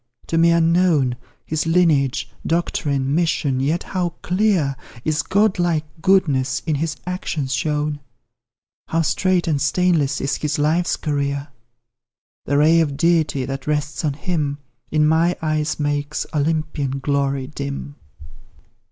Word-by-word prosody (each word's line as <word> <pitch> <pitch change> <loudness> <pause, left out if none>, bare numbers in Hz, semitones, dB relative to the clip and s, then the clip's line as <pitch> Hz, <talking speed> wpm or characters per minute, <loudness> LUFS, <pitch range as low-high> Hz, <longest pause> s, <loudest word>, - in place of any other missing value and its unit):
to - - -3
me 165 +1 +5
unknown 165 -6 +3 0.3
His 155 +1 -2
lineage 150 -8 +2 0.2
doctrine 140 -5 0
mission; 150 -5 +1
yet 150 +6 0
how 175 -3 -2
clear 180 -8 +1 0.3
Is 155 -1 +1
God 200 +1 +2
like 165 -3 +1 0.2
goodness 145 -9 +2
in 155 - 0
his 155 +2 -1
actions 165 -7 -3
shown, 150 0 -1 0.9
How 165 0 +1
straight 180 +3 +1
and 145 -4 +1
stainless 150 -2 +2
is 135 0 -1
his 150 -1 -2
life's 160 +4 +1
career! 140 -1 -2 1.0
The 140 - +2
ray 160 +3 +5
of 145 -4 0
Deity 160 -5 +2
that 135 +1 -6
rests 150 +1 -1
on 150 -3 0
him, 150 -2 -2 0.3
In 150 0 +2
my 165 +3 +3
eyes 155 -1 -1
makes 145 0 -1
Olympian 150 -3 -1
glory 140 -1 0
dim. 140 +1 -6
150 Hz, 130 wpm, -21 LUFS, 140-170 Hz, 1.0 s, me